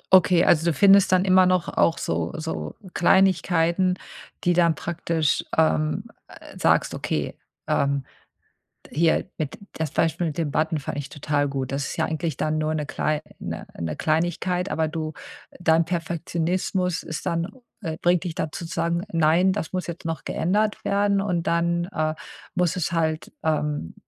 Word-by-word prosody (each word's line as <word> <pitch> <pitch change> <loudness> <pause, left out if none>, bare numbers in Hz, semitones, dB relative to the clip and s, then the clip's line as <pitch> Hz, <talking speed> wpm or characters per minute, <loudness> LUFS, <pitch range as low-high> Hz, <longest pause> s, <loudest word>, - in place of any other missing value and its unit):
Okay, 180 -1 +5
also 165 0 +4
du 170 - +3
findest 195 +5 +6
dann 185 0 +4
immer 185 -1 +6
noch 185 -2 +2
auch 165 - +2
so 85 0 -2
so 160 0 -4 0.2
Kleinigkeiten, 180 -1 +3 0.5
die 175 - +3
dann 170 -2 +3
praktisch 165 -1 -1
ähm, 155 -1 +2 0.5
sagst, - - +2
okay, - - -2 0.3
ähm, 140 -1 +1 0.9
hier 165 +4 +2
mit 155 -4 -3 0.2
das 160 -3 -3
Beispiel 165 +1 +1
mit 155 -3 -3
den 160 -3 -1
Button 155 +2 0
fand 140 - -5
ich 145 - -5
total 145 0 0
gut. 135 -2 -3
Das 140 +1 -2
ist - - -5
ja - - +1
eigentlich 160 -2 -2
dann 155 +1 0
nur 155 0 0
'ne 150 -1 -2
klei 150 0 -1 0.2
'ne - - -6
'ne 80 -2 -3
Kleinigkeit, 175 - 0
aber 160 0 0
du 155 0 -4 0.5
dein 165 -1 +4
Perfektionismus 175 +2 -1
ist 160 - -5
dann 170 +4 -1 0.3
äh, 160 -4 -3
bringt 175 +1 +3
dich 170 -3 -3
da 155 - -2
zu 170 - -6
sagen: 170 +1 -1
„Nein, 165 +4 +4
das 195 -5 -4
muss 185 -1 -2
jetzt 170 -1 -7
noch 165 -1 -3
geändert 210 +5 0
werden“ 200 0 +2
und 180 -4 -1
dann, 170 +1 +1
äh, 155 0 0 0.4
muss 180 -2 +2
es 175 -2 -1
halt, 160 -2 -1
ähm, 150 - -1
165 Hz, 165 wpm, -24 LUFS, 155-180 Hz, 0.9 s, findest